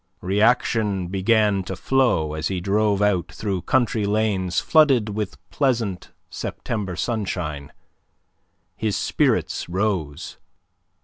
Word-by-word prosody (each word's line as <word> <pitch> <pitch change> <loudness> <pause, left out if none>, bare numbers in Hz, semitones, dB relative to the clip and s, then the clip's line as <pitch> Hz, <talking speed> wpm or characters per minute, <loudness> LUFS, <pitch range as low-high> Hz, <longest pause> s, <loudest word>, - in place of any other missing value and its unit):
Reaction 105 -1 +1
began 100 +1 +2
to - - -4
flow, 120 - +1
as 80 0 -2
he 95 -2 -2
drove 100 +2 +1
out 100 -4 +1
through 100 -4 -3
country 115 -1 +1
lanes 100 -4 0
flooded 135 -9 +4
with 105 -2 -4
pleasant 115 -9 -1 0.2
September 100 -6 -4
sunshine. 90 - -3 1.0
His 110 -3 -1
spirits - - 0
rose. 90 -6 -2
100 Hz, 105 wpm, -23 LUFS, 90-110 Hz, 1.0 s, flooded